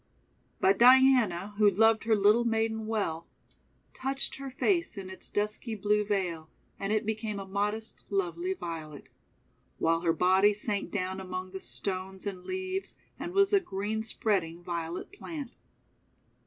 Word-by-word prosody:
But 195 Hz, +1 st, +3 dB
Diana, 240 Hz, -7 st, +5 dB
who 210 Hz, -1 st, +7 dB
loved 225 Hz, +3 st, +3 dB
her 225 Hz, -1 st, +4 dB
little 210 Hz, +3 st, +4 dB
maiden 220 Hz, -1 st, 0 dB
well, 195 Hz, -7 st, -2 dB, 0.7 s
touched 270 Hz, +1 st, -3 dB
her 275 Hz, 0 st, -6 dB
face 335 Hz, -, +1 dB
in 190 Hz, -1 st, -6 dB
its 190 Hz, -, -4 dB
dusky 210 Hz, +2 st, -2 dB
blue 210 Hz, +1 st, +1 dB
veil, 180 Hz, -6 st, -2 dB, 0.3 s
and 195 Hz, +1 st, -2 dB
it 215 Hz, +1 st, +1 dB
became 215 Hz, -1 st, -2 dB
a 195 Hz, -, -6 dB
modest, 205 Hz, +3 st, -3 dB
lovely 185 Hz, -2 st, -1 dB
Violet; 160 Hz, -5 st, -7 dB, 0.7 s
while 165 Hz, 0 st, +2 dB
her 170 Hz, -1 st, +2 dB
body 190 Hz, +5 st, +4 dB
sank 205 Hz, -1 st, 0 dB
down 190 Hz, -1 st, -2 dB
among 185 Hz, 0 st, -5 dB
the 190 Hz, 0 st, -7 dB
stones 190 Hz, 0 st, -4 dB
and 190 Hz, -3 st, -5 dB
leaves, 375 Hz, +1 st, -3 dB, 0.2 s
and 345 Hz, -, -4 dB
was 395 Hz, +1 st, +3 dB
a 400 Hz, -, +7 dB
green 210 Hz, -, -3 dB
spreading 185 Hz, -6 st, -1 dB
Violet 170 Hz, -, -4 dB
plant. 305 Hz, -9 st, -7 dB
205 Hz, 145 wpm, -29 LUFS, 185-225 Hz, 0.7 s, who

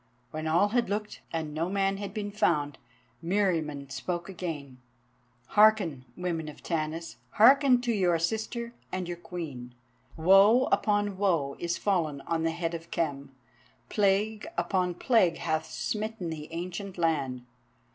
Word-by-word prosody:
When 155 Hz, 0 st, -4 dB
all 175 Hz, +6 st, +3 dB
had 240 Hz, -2 st, +1 dB
looked, 210 Hz, +1 st, -3 dB
and 160 Hz, -2 st, -3 dB
no 165 Hz, +3 st, -1 dB
man 195 Hz, 0 st, +1 dB
had 200 Hz, -1 st, -5 dB
been 205 Hz, 0 st, -4 dB
found, 150 Hz, -8 st, +1 dB, 0.4 s
Meriamun 165 Hz, -7 st, 0 dB
spoke 175 Hz, +7 st, -4 dB
again. 155 Hz, -8 st, -6 dB, 0.7 s
"Hearken, 205 Hz, -11 st, +4 dB
women 170 Hz, -3 st, -2 dB
of 150 Hz, -, -13 dB
Tanis, 165 Hz, 0 st, -3 dB, 0.2 s
hearken 260 Hz, +2 st, +6 dB
to 240 Hz, -1 st, 0 dB
your 180 Hz, -5 st, +2 dB
sister 220 Hz, +7 st, -2 dB, 0.2 s
and 185 Hz, -1 st, -3 dB
your 175 Hz, -, -3 dB
Queen. 145 Hz, -9 st, -7 dB, 0.4 s
Woe 195 Hz, +9 st, +6 dB
upon 205 Hz, -2 st, +1 dB
woe 165 Hz, -9 st, +1 dB
is 170 Hz, 0 st, -1 dB
fallen 160 Hz, -8 st, 0 dB
on 165 Hz, +2 st, -2 dB
the 165 Hz, -, +1 dB
head 165 Hz, 0 st, -3 dB
of 165 Hz, 0 st, -7 dB
Khem. 140 Hz, -4 st, -3 dB, 0.5 s
Plague 210 Hz, +3 st, +1 dB
upon 180 Hz, -2 st, 0 dB
plague 185 Hz, -6 st, +3 dB
hath 160 Hz, -1 st, -2 dB
smitten 215 Hz, -5 st, -3 dB
the 155 Hz, -1 st, -7 dB
ancient 180 Hz, +3 st, -5 dB
land. 140 Hz, -7 st, 0 dB
175 Hz, 140 wpm, -28 LUFS, 160-205 Hz, 0.7 s, hearken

